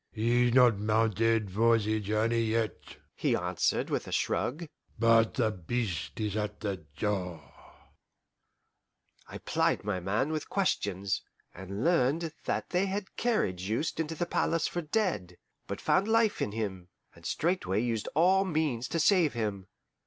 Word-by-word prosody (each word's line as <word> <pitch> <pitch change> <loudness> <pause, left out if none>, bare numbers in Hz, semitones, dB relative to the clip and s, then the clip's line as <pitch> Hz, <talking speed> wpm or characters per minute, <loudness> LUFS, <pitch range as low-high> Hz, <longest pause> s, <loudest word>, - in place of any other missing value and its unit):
"He's 120 +2 +2
not 120 -4 +5
mounted 110 0 +1
for 115 +4 +4
the 110 0 0
journey 110 +3 +1
yet," 110 -2 -2 0.2
he - - +1
answered, - - 0
with - - -1
a - - -7
shrug, 155 +7 -1 0.3
"but 115 -1 +4
the 110 -4 +2
Beast 100 0 -3
is 105 -2 -2
at 105 -1 -3
the 100 -3 -2 0.2
door." 90 -8 -3 1.7
I - - -8
plied - - 0
my 100 -2 -1
man 105 - 0
with 155 -1 -3
questions, 100 - 0 0.3
and 95 +4 -6
learned 165 0 +2
that - - -2
they 185 +2 +2
had 195 0 -4
carried 215 - 0
Juste 110 - -2
into 160 0 -2
the 175 - -1
palace 165 -1 0
for 175 - -3
dead, 150 - -1 0.3
but - - -4
found 195 - +2
life 225 -1 +2
in 105 - -1
him, 100 -5 -4 0.3
and - - -18
straightway 160 - 0
used 115 -2 -1
all 185 +5 +4
means 150 -9 -1
to 165 - -2
save 170 -2 +4
him. 105 -5 -3
115 Hz, 150 wpm, -30 LUFS, 105-160 Hz, 1.7 s, not